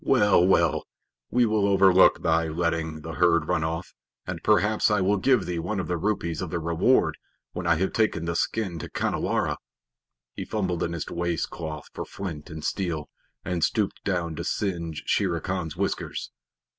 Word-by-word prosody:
Well, 105 -8 +4
well, 95 - +2 0.4
we 125 0 +3
will 105 -2 +2
overlook 95 -1 +5
thy 80 -1 +2
letting 80 -1 -2
the 80 - -6
herd 85 -2 +3
run 80 - +1
off, 80 +2 -3 0.3
and - - -5
perhaps 105 +5 +3
I 105 -1 +2
will 100 +2 +2
give 125 +2 +3
thee 85 -1 -2
one 95 +5 -2
of 90 - -3
the 90 - 0
rupees 85 -3 -1
of 90 - -3
the 85 - -2
reward 85 0 +2 0.3
when - - -4
I - - +5
have 95 +4 -1
taken 105 -7 +1
the 85 0 -2
skin 95 -2 -1
to - - -7
Khanhiwara." - - -1 0.8
He - - -5
fumbled 90 -5 -2
in 85 - -1
his 85 - -4
waist 85 -1 -2
cloth 80 -2 -6
for - - -4
flint 85 -7 -7
and 80 -1 -7
steel, 85 -6 -2 0.4
and 90 -3 -1
stooped 105 -4 0
down 85 -4 -1
to - - -3
singe 85 -6 -2
Shere 90 -4 +1
Khan's 90 -3 -4
whiskers. - - -3
85 Hz, 180 wpm, -26 LUFS, 80-100 Hz, 0.8 s, overlook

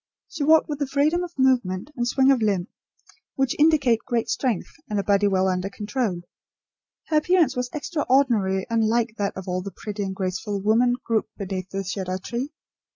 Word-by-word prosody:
She 320 - -4
walked 315 +2 +5
with 295 -2 -4
the 285 - -1
freedom 300 +6 +1
of 350 -3 -8
movement 250 -4 +1
and 240 -1 -1
swing 265 +2 +4
of 260 -4 +2
limb 200 -4 0 0.7
which 270 -2 0
indicate 295 -7 +4
great 240 -3 -1
strength 245 -9 -1 0.2
and 210 -1 0
a - - -1
body 205 0 +3
well 190 -1 +2
under 185 +1 -1
control. 205 -3 -3 0.9
Her 310 - +3
appearance 320 -3 +3
was 250 0 -2
extraordinarily 260 - +1
unlike 225 0 +1
that 200 -1 -1
of 190 - -7
all 180 0 -1
the 200 - -6
pretty 205 +2 -6
and 190 -1 -3
graceful 190 +2 -3
women 230 +5 +3
grouped 220 -1 -1
beneath 190 -2 -4
the 195 0 -3
cedar 185 -1 -3
tree. 245 +9 -4
225 Hz, 180 wpm, -24 LUFS, 195-270 Hz, 0.9 s, walked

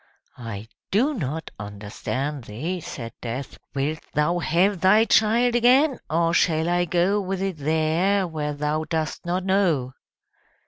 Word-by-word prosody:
"I 110 -3 -6 0.2
do 255 +10 +2
not 160 - -4
understand 110 +7 -4
thee!" 155 - -4
said 115 -7 -7
Death. 125 +3 -5 0.2
"Wilt 145 +3 -1 0.2
thou 160 +4 +2
have 175 +3 +2
thy 210 +4 +5
child 230 +3 +3
again, 255 +4 +4
or 165 +1 +2
shall 160 -2 +2
I 175 0 +2
go 180 +4 +2
with 190 0 -3
it 190 -3 -2
there, 160 +6 +1
where 150 -3 -3
thou 150 +2 -1
dost 160 -2 -3
not 180 +2 -1
know!" 170 -10 +1
165 Hz, 140 wpm, -24 LUFS, 150-195 Hz, 0.2 s, thy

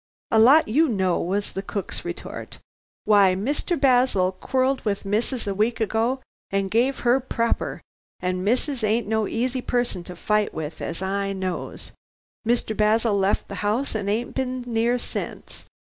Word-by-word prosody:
"A 220 - +5
lot 270 +8 +7
you 300 +8 +3
know," 190 -5 +1
was 200 +4 -1
the 195 - -4
cook's 195 -1 -4
retort. 175 0 -7 0.5
"Why 200 -3 +5
Mr. 285 - -1
Basil 245 -9 +3
quarrelled 260 +7 0
with 205 -2 -2
missus 225 +5 -1
a 200 - -1
week 220 +4 0
ago 225 +4 0 0.3
and 195 -1 -1
gave 250 +5 +2
her 245 +2 +4
proper, 235 -3 -1 0.4
and 180 0 -1
missus 250 +4 0
ain't 215 +1 +2
no 220 -1 +1
easy 255 +2 -1
person 245 -8 -1
to 180 - -8
fight 210 +4 0
with, 155 0 -5
as 165 +3 -4
I 195 +1 -1
knows. 185 -2 -5 0.6
Mr. 230 -2 +1
Basil 215 +1 +3
left 195 0 +1
the 200 - -6
house 215 +7 0
and 205 -2 -2
ain't 230 +4 -1
been 255 -1 -2
near 235 +1 +1
since." - - -6
220 Hz, 160 wpm, -24 LUFS, 195-245 Hz, 0.6 s, lot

